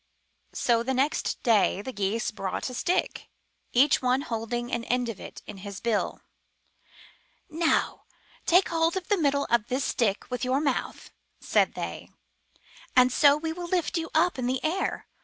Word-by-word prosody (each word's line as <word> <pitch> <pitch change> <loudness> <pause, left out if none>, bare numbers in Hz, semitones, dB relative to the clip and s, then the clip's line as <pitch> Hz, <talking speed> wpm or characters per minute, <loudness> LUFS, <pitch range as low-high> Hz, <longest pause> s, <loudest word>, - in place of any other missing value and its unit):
So 235 -2 +2
the 260 +2 -1
next 280 +4 0
day 210 -4 +3
the 260 - -6
Geese 205 +3 -1
brought 195 +4 -4
a - - -8
stick, 350 +8 -1 0.4
each 280 +5 +4
one 255 +1 +2
holding 240 0 -3
an 235 -1 -1
end 245 -1 0
of 220 - -6
it - - -10
in - - -9
his 195 0 -8
bill. 230 -3 -1 1.3
Now 325 +1 0 0.4
take 360 +3 +5
hold 330 +1 +1
of 370 - -6
the 410 - +3
middle 280 -1 +2
of 235 -2 +2
this 260 +2 -1
stick 215 -1 -1
with 250 - -3
your 255 +2 +1
mouth," 285 -3 -2 0.3
said - - +1
they, - - -6 0.9
''and 255 0 +6
so 285 +2 +5
we 320 +1 -3
will 350 +1 -6
lift 350 -1 0
you 330 -1 -2
up 335 -2 +3
in 245 - -1
the 260 +1 0
air. 330 +5 -1
255 Hz, 170 wpm, -27 LUFS, 235-315 Hz, 1.3 s, and